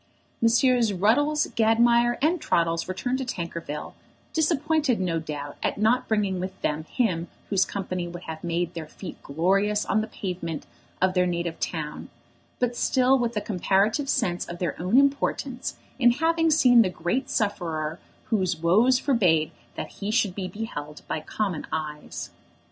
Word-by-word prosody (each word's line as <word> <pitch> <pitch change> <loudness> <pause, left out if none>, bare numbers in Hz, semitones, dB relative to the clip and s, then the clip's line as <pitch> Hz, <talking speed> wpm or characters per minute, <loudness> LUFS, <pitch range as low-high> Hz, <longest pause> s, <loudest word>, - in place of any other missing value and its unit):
Messrs. 235 0 +4
Ruddles, 290 +11 +3
Gadmire, 235 +2 +4
and 330 +2 +2
Troddles 165 0 +1
returned 245 +8 -2
to - - -1
Tankerville, 170 - -5 0.4
disappointed 310 - +1
no 175 -3 0
doubt 145 -2 -6
at - - -1
not 220 +4 +2
bringing 205 -4 0
with 185 +1 -5
them 150 +1 -1
him 175 -9 0 0.2
whose 195 -2 +4
company 185 -3 -3
would 175 +1 -8
have 160 +1 -7
made 170 0 -1
their 165 -2 -6
feet 175 +3 -9
glorious 195 +8 +1
on 215 - +2
the 220 - -4
pavement 180 -6 -5 0.4
of 185 0 +3
their 180 -1 +3
native 170 -1 -2
town, 155 -3 -4 0.5
but 245 -1 0
still 260 +2 +3
with 235 -2 -1
a - - +1
comparative 205 - +1
sense 180 -11 +1
of 175 - -6
their 175 -4 -2
own 185 +8 +2
importance 275 -2 +1 0.2
in 245 -2 +6
having 325 +3 +2
seen 255 -6 +6
the 195 - +2
great 215 +9 -2
sufferer 165 -7 -1 0.3
whose 185 -5 +1
woes 210 +11 +4
forbade 180 - +2 0.2
that - - -5
he 200 - -2
should 215 -4 +2
be 185 -1 -4
beheld 160 -7 -6
by - - -2
common 190 0 -3
eyes. 150 -1 -5
195 Hz, 155 wpm, -26 LUFS, 170-240 Hz, 0.5 s, in